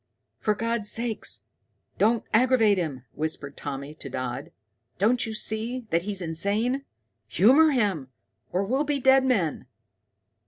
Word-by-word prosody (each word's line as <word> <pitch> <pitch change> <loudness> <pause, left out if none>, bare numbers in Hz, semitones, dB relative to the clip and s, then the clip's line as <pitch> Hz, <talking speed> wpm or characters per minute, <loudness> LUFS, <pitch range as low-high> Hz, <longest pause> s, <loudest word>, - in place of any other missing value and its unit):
"For 210 - +1
God's 230 -1 -1
sake 230 -1 -1 0.8
don't 225 +2 +3
aggravate 225 -4 +4
him," 140 -7 -4
whispered 150 -2 -3
Tommy 140 0 -6
to 155 -2 -9
Dodd. 125 -1 -4 0.5
"Don't 230 +5 +2
you 220 - -5
see 225 +4 -1
that 170 - +2
he's 195 0 -4
insane? 205 - -1 0.4
Humor 280 +10 +5
him, 205 - 0 0.4
or 185 +2 0
we'll 260 +8 0
be 290 -1 -1
dead 265 0 +5
men. 195 - 0
215 Hz, 130 wpm, -26 LUFS, 165-245 Hz, 0.8 s, Humor